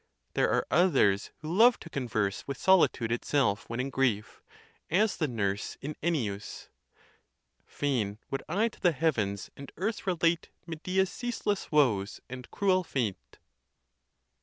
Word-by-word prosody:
There - - +2
are - - +1
others 130 - +3
who 160 +3 -3
love 235 +3 +6
to - - -9
converse 110 -7 -2
with 140 -2 -4
solitude 170 -11 +3
itself 120 -3 0
when 115 +1 -4
in 135 +2 -2
grief, 120 -6 0 0.5
as 205 +5 +2
the 155 - 0
nurse 100 -5 -2
in 145 +2 -5
Ennius, 115 -12 -2 1.0
Fain 115 -8 -1
would 135 - -2
I 215 +4 +2
to - - -19
the 175 -3 +3
heavens 110 - -1
and 140 0 -10
earth 205 +4 -3
relate 170 -2 +1 0.2
Medea's 185 +3 -1
ceaseless 230 -5 -3
woes 115 -10 +2
and 125 0 -8
cruel 185 -2 +2
fate.? 120 - -3
140 Hz, 135 wpm, -29 LUFS, 110-180 Hz, 1.0 s, love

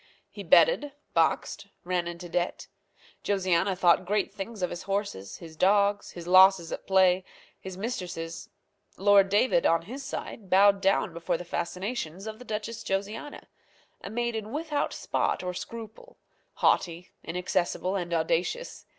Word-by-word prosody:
He - - -8
betted, 295 - +4 0.2
boxed, - - 0 0.2
ran 175 -1 -1
into 170 +1 -7
debt. 175 +1 -2 0.6
Josiana 190 -1 +1
thought 175 0 +4
great 200 +1 -1
things 205 0 -6
of 180 - -1
his 175 - -5
horses, 195 - -3
his 165 -2 -11
dogs, 200 +3 +2
his 170 -1 -8
losses 185 -1 +6
at - - -6
play, 190 -1 +4 0.4
his 190 -1 -8
mistresses. 175 -7 -5 0.5
Lord 200 0 +5
David, 250 +5 +3
on 165 0 +2
his 255 +10 -8
side, 225 -6 -7
bowed 200 +1 +5
down 195 -2 +2
before 170 +1 -2
the 180 - -8
fascinations 180 +1 -4
of 220 0 -7
the 250 - -11
Duchess 220 +1 -5
Josiana 205 +8 -4 0.6
a - - -6
maiden 225 -1 -3
without 300 0 -2
spot - - -1
or 180 0 -3
scruple, 230 - -9 0.4
haughty, 175 0 +1
inaccessible, 180 +2 -1
and 175 -3 -3
audacious. 170 - -1
190 Hz, 140 wpm, -28 LUFS, 175-215 Hz, 0.6 s, losses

